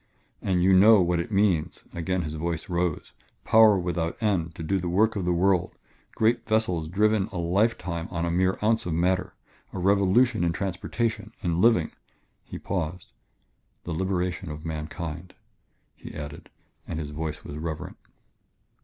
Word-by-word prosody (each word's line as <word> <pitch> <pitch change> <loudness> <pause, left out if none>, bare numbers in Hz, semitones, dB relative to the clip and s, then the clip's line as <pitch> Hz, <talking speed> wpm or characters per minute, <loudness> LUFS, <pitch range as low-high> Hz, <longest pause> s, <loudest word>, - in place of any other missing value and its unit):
"And 90 -2 +1
you 95 +1 +5
know 105 +3 +7
what 90 -1 +2
it 85 - -4
means" 95 -6 +1
again 90 +1 -1
his 75 -1 -5
voice 85 +2 -3
rose 85 -2 -2 0.3
"power 110 -2 +6
without 85 -2 -2
end 90 -8 0
to 80 - -6
do 95 +4 0
the 90 -1 -3
work 110 +6 +2
of 95 -4 -2
the 90 - +1
world 90 +1 +1 0.4
great 115 +2 +2
vessels 100 -8 0
driven 105 +3 +2
a 100 - -8
lifetime 90 -1 0
on 85 -1 -2
a 85 - -1
mere 95 +2 +1
ounce 110 -2 +2
of 80 - -1
matter 90 +2 0 0.4
a - - -7
revolution 100 +5 +3
in 85 -1 +1
transportation 105 +4 -3
in 85 -1 0
living...." 110 -9 +4 0.5
He - - -8
paused. 90 -1 -4 0.7
"The 85 - -4
liberation 90 0 -2
of 75 +1 -7
mankind," 80 +2 -6 0.6
he - - -11
added, 75 0 -8 0.4
and 80 - -4
his 75 -2 -5
voice 75 0 -5
was 70 - -8
reverent. 80 -1 -5
90 Hz, 160 wpm, -26 LUFS, 85-100 Hz, 0.7 s, know